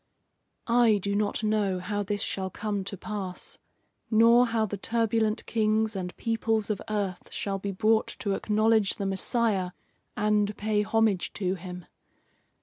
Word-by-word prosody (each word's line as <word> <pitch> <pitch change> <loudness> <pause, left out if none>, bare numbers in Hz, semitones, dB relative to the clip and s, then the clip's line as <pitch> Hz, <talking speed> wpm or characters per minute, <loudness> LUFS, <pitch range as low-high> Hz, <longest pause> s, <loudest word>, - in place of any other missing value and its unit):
"I 235 -2 +4
do 200 +1 -2
not 205 +1 0
know 210 -3 +1
how 205 +3 -2
this 205 0 -2
shall 190 -1 -2
come 205 0 -3
to 195 - -5
pass, 190 -2 -6 0.5
nor 235 +2 +6
how 225 -1 +1
the 205 - -4
turbulent 225 +1 0
kings 220 -1 +1
and 180 -2 -5
peoples 225 -2 0
of 205 - -3
earth 200 -4 -3
shall 195 -1 -3
be 200 +1 -3
brought 220 +3 +2
to 200 - 0
acknowledge 215 0 +2
the 200 - -4
Messiah 195 -1 0 0.4
and 210 0 +1
pay 210 0 +1
homage 210 -3 +1
to 185 -3 -1
him. 180 -1 -8
210 Hz, 145 wpm, -27 LUFS, 195-220 Hz, 0.5 s, nor